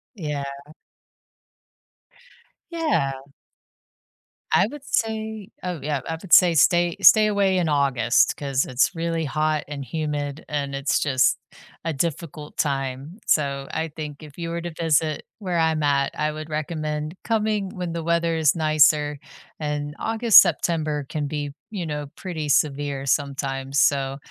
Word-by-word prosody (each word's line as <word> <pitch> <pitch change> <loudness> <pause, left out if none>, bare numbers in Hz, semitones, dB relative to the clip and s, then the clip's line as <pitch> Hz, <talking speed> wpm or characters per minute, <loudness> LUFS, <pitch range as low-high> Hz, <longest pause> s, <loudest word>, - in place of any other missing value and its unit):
Yeah. 150 -6 -4 2.3
Yeah. 305 - 0 1.4
I 190 - +5
would 285 +2 -10
say 220 -4 -2
oh 180 -4 -3
yeah, 145 -2 -2
I 160 - -2
would 195 - -3
say, 175 -3 +7
"Stay 175 +2 +4
stay 215 -1 +7
away 200 -2 +2
in 165 -3 0
August 135 -4 +2
'cause 140 -2 -1
it's 130 +8 +1
really 165 -1 -1
hot 155 +1 0
and 140 -2 -6
humid 150 -1 -3
and 140 -2 -2
it's 140 +1 0
just 130 -3 +2 0.5
a 165 - -1
difficult 150 0 -4
time," 135 - -2
so 140 -2 +1
I 160 0 -2
think 150 -1 -8
if 150 +1 -13
you 165 0 -3
were 170 0 -3
to 175 0 -5
visit 155 -2 +1
where 180 -5 -2
I'm 160 -2 +1
at 140 -1 +2
I 150 0 +1
would 155 +1 -7
recommend 155 +1 -3
coming 215 -3 0
when 175 -2 -4
the 165 -1 -4
weather 170 0 +1
is 160 0 +3
nicer 150 -2 +3 0.4
and 150 0 -3
August, 225 -1 +7
September 155 -4 -1
can 150 -2 -3
be, 145 -1 -4 0.2
you 190 -6 -4
know, 150 -2 -4
pretty 160 -6 -5
severe 140 -1 +1
sometimes, 135 -1 -1
so, 135 -1 +2
155 Hz, 145 wpm, -23 LUFS, 145-170 Hz, 2.3 s, say